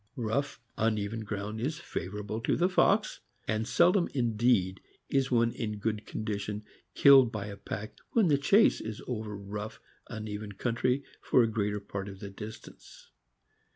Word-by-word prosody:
Rough, 125 +5 -1 0.2
uneven 110 0 0
ground 105 0 -4
is 150 +5 -1
favorable 105 - -5
to - - +1
the 175 - +3
fox, 185 - +2 0.3
and 110 +1 0
sel 180 - +5
dom 185 -2 +1
indeed 115 -6 +2 0.3
is 135 -1 +2
one 115 -1 +3
in 105 -3 -4
good 105 0 -2
condition 105 -1 -4 0.3
killed 135 -4 +7
by 105 -3 -4
a 100 -1 -6
pack 105 +2 -6 0.2
when 220 -5 +4
the 145 -3 +3
chase 200 +10 +4
is 110 -1 -6
over 110 -4 -4
rough, 105 +2 -6 0.3
uneven 105 -1 -5
country 125 +5 0 0.2
for 125 - +4
a - - +2
greater 105 -1 -1
part 100 0 -6
of 95 -1 -10
the 100 0 -7
distance. 105 +3 -11
110 Hz, 155 wpm, -30 LUFS, 105-125 Hz, 0.3 s, killed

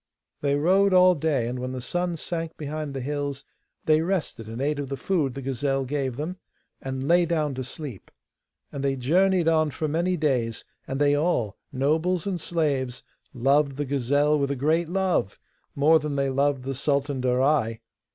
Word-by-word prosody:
They 140 -1 +1
rode 185 +6 +3
all 185 0 +7
day, 145 -7 0
and 125 +1 -4
when 130 +1 -4
the 130 - -4
sun 175 +7 -2
sank 165 0 -4
behind 150 -1 -5
the 135 - -3
hills 145 0 -3 0.4
they 155 0 +4
rested, 165 - -2
and 115 +2 -6
ate 145 +2 0
of 140 -2 -4
the 135 - -3
food 150 -9 0
the 135 - -6
gazelle 135 +1 -1
gave 135 -2 -2
them, 160 +7 -4 0.4
and 130 0 -4
lay 175 +2 +5
down 155 -4 0
to 130 0 -4
sleep. 130 - -8 0.6
And 140 - -5
they 135 -1 +1
journeyed 175 +7 +2
on 155 -1 +3
for 155 +2 -3
many 170 +4 0
days, 125 -7 0 0.2
and 135 - -3
they 145 0 +4
all, 145 - 0 0.2
nobles 160 +6 +1
and 185 -4 -2
slaves, 140 -8 -1 0.3
loved 140 +2 +2
the 145 - -1
gazelle 145 +3 +2
with 140 -1 0
a 140 - -1
great 155 +5 +1
love 185 - 0 0.4
more 155 +3 +5
than 150 -1 -3
they 140 -1 +1
loved 140 0 +1
the 135 +1 -3
Sultan 140 0 0
Darai. 125 -2 +2
145 Hz, 180 wpm, -25 LUFS, 135-160 Hz, 0.6 s, all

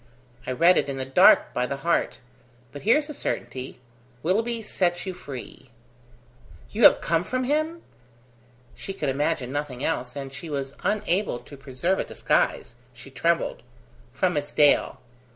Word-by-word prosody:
I - - -1
read 170 +8 +5
it - - -2
in 135 - -4
the 130 - -3
dark, 135 - +5
by 125 0 0
the 140 - -3
heart. 170 - +1 0.5
But 145 - -9
here's 290 +8 +3
a 300 - -6
certainty: 130 - -4 0.4
Willoughby 225 +6 0
sets 175 -4 -1
you 190 - -4
free." 135 -6 -10 1.0
"You 220 +1 +3
have - - +7
come 165 0 +1
from 255 +6 -2
him?" 310 +5 -1 0.9
she 195 - -7
could 155 -7 -2
imagine 140 -2 -1
nothing 145 -2 -4
else, 125 -6 -2
and 135 -1 -6
she 165 +3 -8
was 140 -2 -4
unable 205 - 0
to 145 - -13
preserve 140 +7 -2
a - - +1
disguise; - - 0 0.2
she 125 +4 -13
trembled. 165 +4 0 0.5
"From 180 +8 0
Miss 145 0 -3
Dale." 145 -1 +3
155 Hz, 155 wpm, -25 LUFS, 135-195 Hz, 1.0 s, have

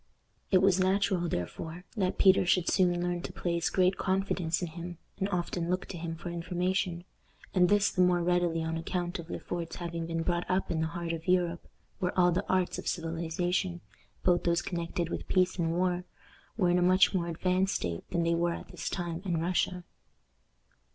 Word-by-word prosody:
It 185 -1 +4
was 190 -1 +4
natural, 185 -2 +2
therefore, 160 - -4
that 190 -4 0
Peter 190 0 +6
should 180 -1 +2
soon 175 -2 +3
learn 175 0 -1
to - - -6
place 170 -1 -1
great 185 0 +2
confidence 190 -3 0
in 175 - -3
him, 170 +1 -7 0.2
and 195 0 0
often 175 -2 -2
look 185 +1 0
to 180 - -5
him 165 0 -4
for 170 +1 -6
information, 175 +1 -1 0.5
and 180 -2 +4
this 205 0 +4
the 185 - +1
more 180 -1 +4
readily 175 -2 +1
on 160 0 -2
account 175 +2 -3
of 170 0 -8
Le - - -3
Fort's 170 -2 -5
having 170 -1 -4
been 165 0 -2
brought 175 +1 -1
up 185 +1 0
in 160 -1 0
the 160 - +1
heart 170 0 -4
of 165 +1 -6
Europe, 175 -2 +1 0.3
where 180 0 -1
all 180 -1 +5
the 175 - -2
arts 185 -1 +1
of - - -7
civilization, 175 +2 -1 0.4
both 175 -1 +3
those 170 0 +1
connected 170 -1 -2
with - - -4
peace 185 0 +2
and 165 -1 +1
war, 180 0 +1 0.5
were 180 -5 +3
in 180 - +3
a - - +1
much 185 +2 +5
more 175 -3 0
advanced 185 +3 +1
state 85 -1 -2
than 170 -1 0
they 170 0 +2
were 170 0 +1
at - - -8
this - - -4
time 175 -2 -3
in 175 -4 0
Russia. 180 +1 0
175 Hz, 200 wpm, -30 LUFS, 170-185 Hz, 0.5 s, Peter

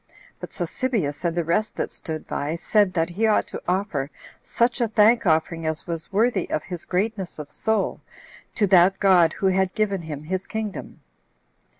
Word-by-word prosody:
But - - -8
Sosibius, 210 - -2
and 170 -1 -1
the 170 - +2
rest 190 +7 0
that - - -3
stood 155 -1 -6
by, 145 +3 -2
said 205 +3 +2
that 165 -1 +1
he 220 +6 +1
ought 215 - +3
to - - -6
offer 180 -7 -1 0.3
such 240 +2 0
a 235 - +3
thank 220 0 +4
offering 160 +1 +1
as 155 -1 -2
was 165 0 -5
worthy 210 -1 +1
of 155 - -1
his 180 -4 -6
greatness 195 0 -2
of 150 -1 -8
soul, 220 -1 -1 0.5
to 210 - +3
that 190 0 +5
God 180 -5 +5
who - - -4
had 190 0 +2
given 200 -3 0
him 150 -3 -7
his 185 +4 -3
kingdom. 220 -3 -5
185 Hz, 180 wpm, -24 LUFS, 165-215 Hz, 0.5 s, that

